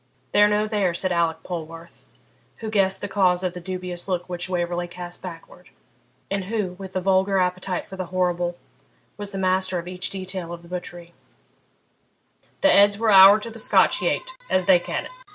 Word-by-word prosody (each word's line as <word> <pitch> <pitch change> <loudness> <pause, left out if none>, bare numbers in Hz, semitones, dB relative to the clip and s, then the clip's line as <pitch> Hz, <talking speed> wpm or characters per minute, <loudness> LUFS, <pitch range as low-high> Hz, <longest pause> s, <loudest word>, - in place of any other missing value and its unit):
'They're 205 - +6
no 210 0 +1
there,' 205 -5 0
said 185 +1 -1
Alick 165 -2 0
Polwarth, 165 -1 -8 0.5
who 220 -1 -6
guessed 190 -2 +1
the - - -3
cause 185 -3 +2
of 180 -1 -1
the 180 - -7
dubious 180 0 -5
look 180 -2 -2
which 180 0 -5
Waverley 175 -1 -2
cast 175 0 -8
backward, 180 0 -11 0.6
and 200 -1 -1
who, 205 -2 -2
with 190 -1 -8
the 185 - 0
vulgar 190 +1 +2
appetite 185 0 -1
for 190 - -10
the 185 -1 -4
horrible, 175 -1 -1 0.6
was 205 -1 -6
master 185 -1 0
of 170 0 -5
each 180 0 -4
detail 185 -3 -6
of 170 0 -9
the - - -14
butchery 175 -1 -8 1.5
'the 295 - +5
heads 200 -2 +5
are 225 -1 +2
ower 195 +2 +9
the 230 +1 -8
Scotch - - +3
yate, - - 0 0.2
as 185 -1 +1
they 180 -1 +6
ca' - - -3
it. - - -10
185 Hz, 180 wpm, -23 LUFS, 175-195 Hz, 1.5 s, ower